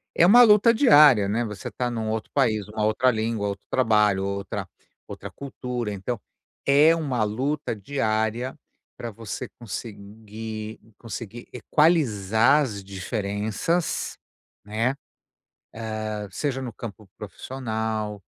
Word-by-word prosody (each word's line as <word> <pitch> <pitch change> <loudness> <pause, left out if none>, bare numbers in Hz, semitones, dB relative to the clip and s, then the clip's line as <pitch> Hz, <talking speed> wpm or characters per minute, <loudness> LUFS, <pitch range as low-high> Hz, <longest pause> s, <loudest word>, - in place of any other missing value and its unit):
é - - +4
uma 240 +7 +9
luta 215 0 +6
diária, 150 - +7
né, 110 +4 0
você 105 -5 -6
está 125 -1 -2
num 115 -2 -3
outro 110 0 -3
país, 110 -7 +1
uma 105 0 -2
outra 110 +4 +3
língua, 110 -2 -1
outro 100 -1 -5
trabalho, 105 -6 +3
outra 100 0 -4 0.4
outra - - -8
cultura. 125 -4 -5
Então 100 +4 -4 0.5
é 150 +4 +6
uma 135 -8 -1
luta 130 +6 -2
diária 110 +1 -1 0.4
para 120 - -5
você 105 -2 -6
conseguir 110 0 -7 0.2
conseguir 115 0 -8
equalizar 125 - +3
as 105 -7 -5
diferenças, 105 - -2 0.5
né. 115 +5 0 1.1
Hã, 105 -1 -4
seja 135 +6 -2
no 125 -2 -5
campo 110 -2 -9
profissional, 110 -2 -4
110 Hz, 120 wpm, -25 LUFS, 105-130 Hz, 1.1 s, uma